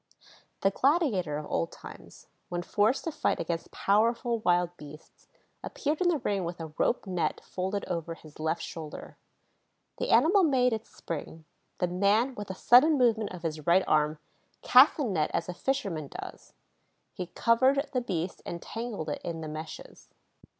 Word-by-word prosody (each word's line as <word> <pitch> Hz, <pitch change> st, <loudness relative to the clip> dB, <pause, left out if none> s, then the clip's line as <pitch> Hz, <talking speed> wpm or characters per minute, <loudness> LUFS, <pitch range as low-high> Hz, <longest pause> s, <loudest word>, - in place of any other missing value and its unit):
The 195 Hz, -, +3 dB
gladiator 230 Hz, -, +1 dB
of 150 Hz, -, -5 dB
old 85 Hz, -, -1 dB
times, -, -, -12 dB, 0.2 s
when 175 Hz, 0 st, -3 dB
forced 215 Hz, +8 st, +1 dB
to 330 Hz, -, -2 dB
fight -, -, 0 dB
against 165 Hz, -1 st, -3 dB
powerful 230 Hz, +3 st, +1 dB
wild 175 Hz, -3 st, +1 dB
beasts, 150 Hz, -1 st, -14 dB, 0.4 s
appeared 300 Hz, +3 st, -2 dB
in 360 Hz, -, +4 dB
the 335 Hz, -, +2 dB
ring 200 Hz, -7 st, -1 dB
with 170 Hz, +1 st, -5 dB
a 160 Hz, -2 st, -7 dB
rope 240 Hz, -, +1 dB
net 180 Hz, -3 st, -1 dB
folded 190 Hz, +2 st, -3 dB
over 170 Hz, -2 st, -4 dB
his 155 Hz, -2 st, -16 dB
left 160 Hz, +2 st, -1 dB
shoulder. 155 Hz, -2 st, -8 dB, 0.8 s
The -, -, -2 dB
animal 385 Hz, +5 st, +5 dB
made 255 Hz, -7 st, +3 dB
its 220 Hz, 0 st, -5 dB
spring. 160 Hz, 0 st, -7 dB, 0.3 s
The -, -, +1 dB
man, 200 Hz, +8 st, +2 dB
with 205 Hz, -4 st, -7 dB
a 190 Hz, -, -4 dB
sudden 285 Hz, +10 st, +6 dB
movement 225 Hz, -4 st, +2 dB
of 180 Hz, -2 st, -9 dB
his 155 Hz, -2 st, -4 dB
right 180 Hz, +2 st, +5 dB
arm, 150 Hz, 0 st, +2 dB, 0.5 s
cast 255 Hz, +4 st, +7 dB
the 300 Hz, -, 0 dB
net 180 Hz, -, 0 dB
as -, -, -1 dB
a 180 Hz, -, -4 dB
fisherman 180 Hz, -, -2 dB
does; -, -, -10 dB, 0.6 s
he 180 Hz, -, -5 dB
covered 260 Hz, -, +2 dB
the 255 Hz, -, +1 dB
beast 180 Hz, -6 st, -3 dB
and 170 Hz, -, -5 dB
tangled 225 Hz, -6 st, -5 dB
it 145 Hz, -, -4 dB
in 165 Hz, -1 st, -4 dB
the 155 Hz, -, -5 dB
meshes. 155 Hz, +1 st, -9 dB
190 Hz, 170 wpm, -29 LUFS, 165-245 Hz, 0.8 s, cast